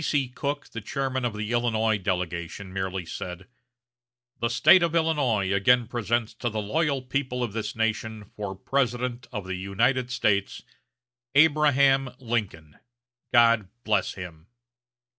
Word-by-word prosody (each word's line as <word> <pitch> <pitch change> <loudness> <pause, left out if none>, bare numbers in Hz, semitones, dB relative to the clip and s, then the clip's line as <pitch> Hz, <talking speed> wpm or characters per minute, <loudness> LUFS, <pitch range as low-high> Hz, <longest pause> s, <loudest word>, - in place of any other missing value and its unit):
B.C. 140 -4 0
Cook, 145 +3 -4
the 115 - -7
chairman 130 +3 -2
of 115 -3 -2
the 105 +1 -4
Illinois 115 -3 +1
delegation, 90 0 -3
merely 95 -1 -3
said: 90 +2 -7 0.9
"The 115 - 0
State 150 +9 +6
of 170 -1 +1
Illinois 135 - +1
again 120 +5 +4
presents 120 -1 -1
to 120 +2 -3
the 110 0 -3
loyal 140 +5 0
people 125 -1 -2
of 115 -4 -3
this 110 -1 -4
nation 110 -1 -2
for 100 -2 -5
President 125 +2 -1
of 105 -5 -5
the 95 - -4
United 120 +7 0
States, 100 -5 0 0.7
Abraham 140 -3 +4
Lincoln 105 - -4 0.5
God 115 -4 +5 0.2
bless 105 -3 0
him!" 85 -3 -9
115 Hz, 135 wpm, -26 LUFS, 100-130 Hz, 0.9 s, State